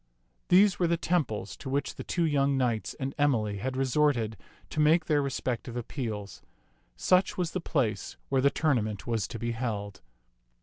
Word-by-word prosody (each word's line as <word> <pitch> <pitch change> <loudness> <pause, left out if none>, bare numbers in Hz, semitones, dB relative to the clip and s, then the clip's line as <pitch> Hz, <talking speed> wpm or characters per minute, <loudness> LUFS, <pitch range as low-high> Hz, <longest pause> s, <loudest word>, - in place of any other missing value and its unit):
These 195 +2 +5
were 175 - +3
the 170 0 +2
temples 130 - -1
to - - -7
which 140 +2 -1
the - - -7
two 170 -2 0
young 140 -2 +2
knights 120 -4 0
and 135 0 -4
Emily 110 -8 +2
had 130 +5 -3
resorted 130 -4 +2 0.4
to - - -3
make 155 +3 +4
their 150 -2 +2
respect 130 -3 -2
ive 120 - -7
appeals. 110 - -5 0.5
Such 185 - +2
was 175 -3 -1
the 185 - -3
place 115 -11 -1
where 135 -1 +2
the 140 - +5
tourna 140 -6 +1
ment 105 -3 -5
was 115 -4 -1
to - - -6
be 120 +1 -2
held. 105 -5 -4
130 Hz, 180 wpm, -29 LUFS, 110-150 Hz, 0.5 s, These